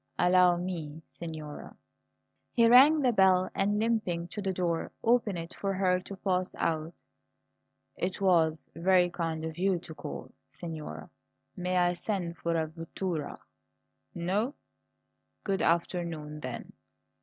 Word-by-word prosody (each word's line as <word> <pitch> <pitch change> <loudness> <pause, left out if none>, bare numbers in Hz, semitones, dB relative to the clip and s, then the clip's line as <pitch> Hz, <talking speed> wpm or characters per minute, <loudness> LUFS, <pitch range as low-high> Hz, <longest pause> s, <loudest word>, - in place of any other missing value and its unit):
Allow 180 0 +5
me, 165 -4 -5
signora!" 155 -3 -8 0.8
He 230 -1 +5
rang 275 +6 +8
the 250 -2 +3
bell, 190 -2 +4
and, 205 +2 +1
limping 210 -7 0
to 210 - -5
the 195 -1 -1
door, 175 -3 -1
opened 230 -5 +2
it 165 +1 -6
for 195 -1 -2
her 185 -1 +2
to 195 +2 -9
pass 185 -1 -1
out. 160 +1 -1 1.0
"It 185 +2 -2
was 165 -5 +2
very 180 0 +3
kind 165 -2 -3
of 160 +1 -6
you 190 0 +2
to 165 -1 -9
call, - - -7 0.3
signora. 150 - -6 0.5
May 180 0 -1
I 175 0 +3
send 175 -2 -3
for 170 0 -1
a 160 - +1
vettura? 165 0 -4 0.8
No? 195 +10 -1 0.9
Good 195 -2 0
afternoon, 165 -3 -1
then! 125 -4 -6
180 Hz, 130 wpm, -30 LUFS, 165-190 Hz, 1.0 s, rang